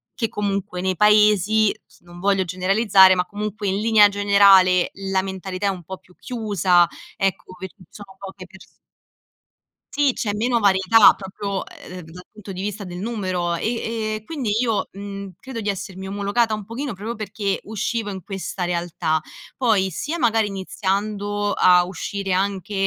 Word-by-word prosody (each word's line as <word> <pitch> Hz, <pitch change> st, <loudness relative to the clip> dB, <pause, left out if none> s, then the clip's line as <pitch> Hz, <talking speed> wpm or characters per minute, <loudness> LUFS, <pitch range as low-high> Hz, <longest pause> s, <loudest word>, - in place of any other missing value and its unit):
che 230 Hz, -, -1 dB
comunque 200 Hz, -3 st, -3 dB
nei 185 Hz, 0 st, -1 dB
paesi 210 Hz, 0 st, +4 dB
s -, -, -25 dB
non 175 Hz, 0 st, -14 dB
voglio 195 Hz, 0 st, +1 dB
generalizzare, 190 Hz, +1 st, +4 dB
ma 180 Hz, 0 st, 0 dB
comunque 210 Hz, +1 st, -5 dB
in 190 Hz, 0 st, 0 dB
linea 215 Hz, -1 st, +5 dB
generale 200 Hz, -3 st, +5 dB, 0.2 s
la 190 Hz, -1 st, +2 dB
mentalità 190 Hz, 0 st, -4 dB
è -, -, +3 dB
un 185 Hz, -3 st, -5 dB
po' 190 Hz, +3 st, -8 dB
più 180 Hz, -, -24 dB
chiusa, 200 Hz, -7 st, +2 dB, 0.3 s
ecco, 190 Hz, -1 st, -2 dB
perché 190 Hz, 0 st, -9 dB
ci 185 Hz, -, -17 dB
sono 200 Hz, -2 st, -13 dB
poche 190 Hz, -1 st, -9 dB
pers 190 Hz, 0 st, -16 dB, 1.3 s
sì, 290 Hz, -3 st, +2 dB
c'è 210 Hz, -3 st, -2 dB
meno 235 Hz, +3 st, +1 dB
varietà 200 Hz, +1 st, +5 dB
proprio, 195 Hz, 0 st, -5 dB
ehm, 180 Hz, 0 st, -11 dB
dal 180 Hz, +2 st, -11 dB
punto 210 Hz, -2 st, -11 dB
di 185 Hz, 0 st, -6 dB
vista 210 Hz, +1 st, -4 dB
del 180 Hz, -2 st, -7 dB
numero, 185 Hz, -5 st, -2 dB
e 225 Hz, +7 st, -2 dB, 0.4 s
e 215 Hz, -, -13 dB
quindi 265 Hz, -4 st, -3 dB
io, 225 Hz, -4 st, 0 dB
mhmm, 200 Hz, 0 st, -8 dB
credo 245 Hz, +1 st, -7 dB
di 210 Hz, -, -2 dB
essermi 190 Hz, -1 st, -5 dB
omologata 205 Hz, +3 st, 0 dB
un 215 Hz, -1 st, -4 dB
pochino 240 Hz, +5 st, -5 dB
proprio 215 Hz, +5 st, -6 dB
perché 205 Hz, -1 st, -3 dB
uscivo 220 Hz, 0 st, -3 dB
in 190 Hz, -1 st, -7 dB
questa 190 Hz, -1 st, -5 dB
realtà. 170 Hz, -2 st, -1 dB, 0.4 s
Poi, 215 Hz, -7 st, +2 dB
sia 295 Hz, -, -4 dB
magari 225 Hz, -5 st, +2 dB
iniziando 205 Hz, +1 st, -2 dB
a 180 Hz, -1 st, +5 dB
uscire 195 Hz, +1 st, -4 dB
anche, 195 Hz, +1 st, -2 dB
200 Hz, 165 wpm, -22 LUFS, 185-210 Hz, 1.3 s, linea